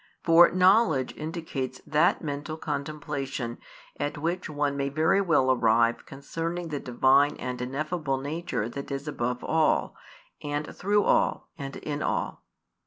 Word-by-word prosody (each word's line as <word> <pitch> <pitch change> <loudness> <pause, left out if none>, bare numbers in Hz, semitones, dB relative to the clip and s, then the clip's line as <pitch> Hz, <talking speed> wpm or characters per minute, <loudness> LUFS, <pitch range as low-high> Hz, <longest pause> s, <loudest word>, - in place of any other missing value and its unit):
For 170 0 +7
knowledge 185 - +3
indicates 155 -5 -5
that 155 +4 +2
mental 150 +1 -4
contemplation 140 -5 -4 0.4
at 145 - -2
which 170 +4 -2
one 145 -1 -1
may 140 0 -1
very 160 +7 +2
well 150 -8 +3
arrive 115 -1 +2
concerning 165 +5 -4
the 145 -2 -3
Divine 135 +3 +3
and 125 -1 -5
ineffable 145 +2 -2
nature 140 -5 -3
that 140 +4 -7
is 140 +1 -4
above 125 -3 -2
all, 160 -1 +1 0.5
and 145 +1 -4
through 205 +2 +2
all, - - +1
and 135 -5 -7
in 150 -1 -4
all. - - -2
145 Hz, 135 wpm, -27 LUFS, 135-160 Hz, 0.5 s, For